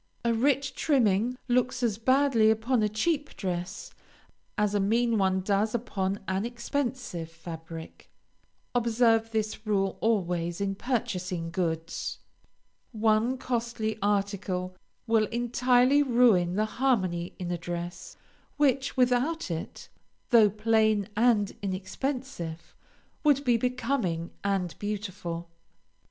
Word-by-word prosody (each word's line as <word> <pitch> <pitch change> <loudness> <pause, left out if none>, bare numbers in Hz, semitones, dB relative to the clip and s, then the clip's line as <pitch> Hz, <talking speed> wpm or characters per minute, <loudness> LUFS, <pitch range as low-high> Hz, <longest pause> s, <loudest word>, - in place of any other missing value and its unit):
A 235 - +3
rich 270 +3 +1
trimming 240 -4 +2
looks 250 0 +1
as 220 -3 0
badly 260 -2 +4
upon 220 +2 +2
a 210 - +2
cheap 290 +7 -1
dress, 180 -1 -4 0.6
as 210 -1 +1
a 205 - +2
mean 225 +3 +2
one 190 -1 +2
does 205 +3 +1
upon 200 -4 -2
an 190 +1 0
expensive 240 - -3
fabric. 165 0 -9 0.6
Observe 230 -1 +3
this 215 0 -3
rule 195 -2 0
always 175 -6 0
in 200 -1 -1
purchasing 185 -7 -2
goods. 165 -2 -2 0.7
One 220 +2 +2
costly 235 -3 -2
article 195 -2 -1 0.3
will 225 -2 +3
entirely 245 +3 +3
ruin 230 -10 +4
the 215 +2 +2
harmony 195 -8 0
in 180 -1 -4
a 175 - -1
dress, 175 +1 -6 0.4
which, 270 -2 +1
without 250 - +1
it, 165 -1 -6 0.4
though 225 -3 +7
plain 215 -1 +2
and 220 -3 +3
inexpensive, 190 - -4 0.5
would 285 -2 +4
be 245 -2 +4
becoming 230 -8 -1
and 195 -4 0
beautiful. 190 -5 -4
215 Hz, 115 wpm, -28 LUFS, 185-245 Hz, 0.7 s, though